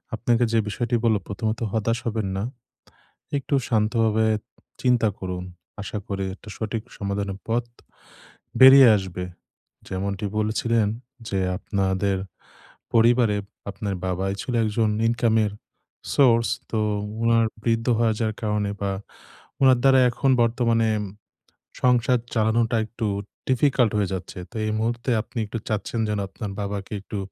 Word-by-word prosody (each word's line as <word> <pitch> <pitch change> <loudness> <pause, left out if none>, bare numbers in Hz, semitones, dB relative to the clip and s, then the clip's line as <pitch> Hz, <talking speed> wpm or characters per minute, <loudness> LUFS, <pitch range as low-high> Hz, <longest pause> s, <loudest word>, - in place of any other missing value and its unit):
আপনাকে 120 +1 +2
যে 115 - +4
বিষয়টি 120 +3 -1
বললাম, 110 -3 +3
প্রথমত 110 +2 -2
হতাশ 115 +1 +1
হবেন 110 -3 -1
না। 95 - -2 0.9
একটু 140 +1 -1
শান্তভাবে 110 -1 +2 0.6
চিন্তা 125 -3 +3
করুন। 90 -1 -4 0.4
আশা 105 +1 -5
করি 100 -1 -3
একটা 105 - -14
সঠিক 110 0 -3
সমাধানের 100 -1 -3
পথ 115 +1 +1 1.0
বেরিয়ে 130 0 +10
আসবে। 95 -2 -5 0.6
যেমনটি 100 +1 -3
বলছিলেন 110 +1 +1 0.4
যে, 95 - 0 0.2
আপনাদের 95 -1 0 0.8
পরিবারে 115 -1 +4 0.3
আপনার 100 0 -4
বাবাই 95 +1 -1
ছিল 125 - -4
একজন 110 +1 +1 0.2
ইনকামের 115 -2 +2 0.6
source, 115 -5 +4 0.2
তো 110 - -1 0.4
উনার 115 0 +4 0.2
বৃদ্ধ 115 -1 +1
হয়ে 115 -1 +2
যাওয়ার 110 -1 -1
কারণে 105 -2 0
বা, 100 -1 -1 0.7
উনার 130 -2 +6
দ্বারা 135 -1 +6
এখন 135 +3 +1
বর্তমানে 115 -1 +2
উম - - -4 0.8
সংসার 125 0 +3 0.2
চালানোটা 115 +1 +2
একটু 115 +1 -5 0.4
difficult 130 -3 +3
হয়ে 100 -2 0
যাচ্ছে। 95 0 -6
তো - - -17
এই 110 - 0
মুহূর্তে 115 +3 -2
আপনি 120 - -12
একটু 105 +2 -5
চাচ্ছেন 110 +2 -2
যেন, 105 -1 -1
আপনার 100 +1 -6
বাবাকে 100 0 -4
একটু 105 - -6
110 Hz, 130 wpm, -24 LUFS, 100-115 Hz, 1.0 s, বেরিয়ে